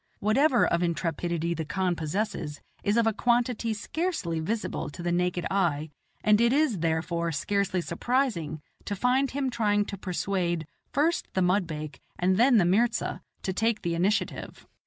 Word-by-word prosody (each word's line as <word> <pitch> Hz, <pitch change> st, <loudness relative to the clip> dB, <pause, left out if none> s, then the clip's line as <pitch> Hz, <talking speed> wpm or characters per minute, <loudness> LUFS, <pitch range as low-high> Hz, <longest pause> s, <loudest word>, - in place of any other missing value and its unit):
Whatever 245 Hz, +4 st, +4 dB
of 170 Hz, -, +1 dB
intrepidity 170 Hz, 0 st, -1 dB
the 165 Hz, -1 st, -3 dB
khan 180 Hz, +3 st, -1 dB
possesses 165 Hz, -2 st, -3 dB, 0.2 s
is 205 Hz, +3 st, +2 dB
of 230 Hz, -, +4 dB
a 225 Hz, -, +2 dB
quantity 240 Hz, 0 st, +1 dB
scarcely 220 Hz, -, -2 dB
visible 215 Hz, +8 st, -2 dB
to 170 Hz, +4 st, -8 dB
the 175 Hz, -, 0 dB
naked 180 Hz, 0 st, 0 dB
eye, 160 Hz, -6 st, 0 dB, 0.3 s
and 210 Hz, +1 st, +5 dB
it 235 Hz, 0 st, +4 dB
is, 280 Hz, -, +2 dB
therefore, 165 Hz, +1 st, 0 dB
scarcely 190 Hz, +4 st, 0 dB
surprising 170 Hz, -, -1 dB, 0.2 s
to 205 Hz, -, -2 dB
find 255 Hz, +6 st, +2 dB
him 270 Hz, 0 st, -1 dB
trying 205 Hz, -3 st, +2 dB
to 200 Hz, -, -7 dB
persuade, 180 Hz, -3 st, -1 dB, 0.3 s
first 320 Hz, +4 st, +1 dB
the 190 Hz, -, +2 dB
mudbake 165 Hz, -6 st, -1 dB, 0.2 s
and 185 Hz, +1 st, +2 dB
then 245 Hz, +2 st, +5 dB
the 185 Hz, -, +4 dB
mirza, 225 Hz, +7 st, +1 dB, 0.2 s
to 190 Hz, -, -1 dB
take 225 Hz, +2 st, 0 dB
the 170 Hz, -, 0 dB
initiative. 185 Hz, +6 st, -1 dB
190 Hz, 155 wpm, -27 LUFS, 170-230 Hz, 0.3 s, and